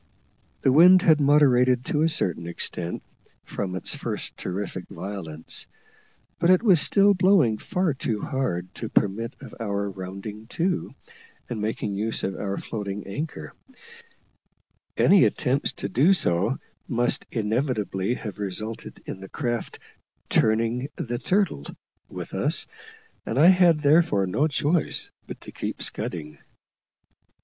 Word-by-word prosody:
The 135 - +4
wind 180 +6 +7
had 155 -3 +5
moderated, 130 -3 +4
to 150 - 0
a 160 - +3
certain 85 - 0
extent, 85 0 -4 0.4
from 95 -2 -4
its 95 - -2
first - - -5
terrific 95 0 -5
violence; 80 -6 -6 0.7
but 170 - +2
it 185 +3 +5
was 185 -9 +6
still 200 0 +5
blowing 180 - +3
far 180 -5 -1
too 115 -5 -3
hard 90 -9 -3
to - - -6
permit 115 +5 0
of - - -11
our 100 -2 -2
rounding 100 +3 -8
to, 180 +1 -1 0.6
and 110 -3 -3
making 105 -1 -2
use 110 +3 -1
of 95 - -2
our 100 -1 -3
floating 100 -2 -5
anchor; 145 +11 -6 1.4
any 195 -2 +6
attempt 135 -1 0
to - - -3
do 135 - +4
so 100 - +1 0.3
must 120 -1 0
inevitably 110 -2 -1
have 105 -4 -7
resulted 105 +3 -4
in - - -6
the 95 0 -10
craft 120 -4 -3 0.5
"turning 115 +4 +1
the 120 -1 -4
turtle" 190 - 0 0.5
with - - -8
us, - - +1 0.6
and 115 - -4
I 160 +6 +7
had, 175 -4 +5
therefore, 145 - +4
no 110 +12 +1
choice 150 +2 -1 0.2
but - - -8
to - - -10
keep - - -5
scudding. 75 -3 -3
115 Hz, 135 wpm, -25 LUFS, 100-150 Hz, 1.4 s, wind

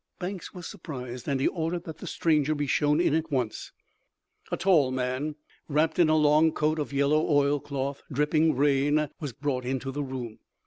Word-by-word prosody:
Banks 185 0 -5
was 180 -3 -9
surprised, 130 - -7
and 140 -2 0
he 135 - +2
ordered 170 0 -2
that 160 -3 -9
the - - -8
stranger 155 -2 +1
be 145 0 -1
shown 150 +2 +2
in 175 - +2
at 160 0 -1
once. 125 -6 -2 0.8
A - - 0
tall 165 -9 +4
man, 130 +4 -2 0.3
wrapped 155 +3 +1
in 170 -3 +5
a 155 - +4
long 155 +1 +4
coat 155 +1 0
of 145 - -3
yellow 140 +2 +2
oilcloth, 140 -1 0
dripping 150 +3 +2
rain, 145 +2 +2
was 145 -5 -4
brought 130 +1 -2
into 130 +1 -3
the 145 +2 -3
room. 130 -5 -6
145 Hz, 180 wpm, -27 LUFS, 135-155 Hz, 0.8 s, in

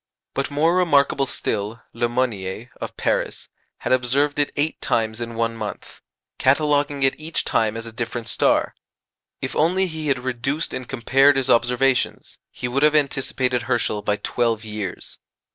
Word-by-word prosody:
But 135 - -1
more 155 +4 +2
remarkable 140 -6 +3
still, 105 -1 -3
Le 120 +1 0
Monnier, 115 -2 -2
of - - -6
Paris, - - -1 0.3
had - - -2
observed 135 +4 +2
it 145 - +1
eight 150 +2 -1
times 110 0 0
in 115 0 -5
one 115 0 0
month, 110 -2 -7 0.4
cataloguing 145 0 +2
it 135 - +4
each 160 +2 -2
time 110 0 +1
as 115 - -5
a 115 - -7
different 120 0 -4
star. - - +2 0.7
If - - -3
only 180 +5 +3
he 160 -3 -4
had 135 -2 +2
reduced 130 +5 -2
and 130 -1 -5
compared 135 +3 +4
his 130 -1 +1
observations, 125 +2 +1
he 125 - -5
would 130 +3 0
have 150 +1 +5
anticipated 130 -3 +1
Herschel 115 -4 0
by 105 0 0
twelve 115 +1 -1
years. 105 -3 -6
130 Hz, 160 wpm, -22 LUFS, 115-145 Hz, 0.7 s, have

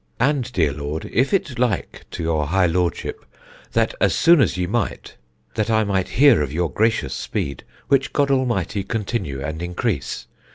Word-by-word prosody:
And, 130 0 +1
dear 80 - +1
Lord, 75 +2 -4
if 130 +4 +2
it 140 -11 -1
like 120 -6 -1
to - - -5
your 80 -3 0
high 95 +3 +3
Lordship 85 -1 -1 0.5
that 115 -1 +2
as 95 -4 +3
soon 170 -3 +6
as 110 - +1
ye 90 - 0
might 105 +2 -3 0.4
that 110 +1 -1
I 110 -1 +3
might 95 -3 -1
hear 140 - +6
of 70 -3 -2
your 85 +1 -1
gracious 110 +1 +1
speed, 70 -2 -4 0.2
which 135 -1 +2
God 140 -1 +1
Almighty 115 -7 0
continue 95 - -3
and 80 +3 -4
increase. 85 -7 -2
100 Hz, 170 wpm, -22 LUFS, 80-120 Hz, 0.5 s, soon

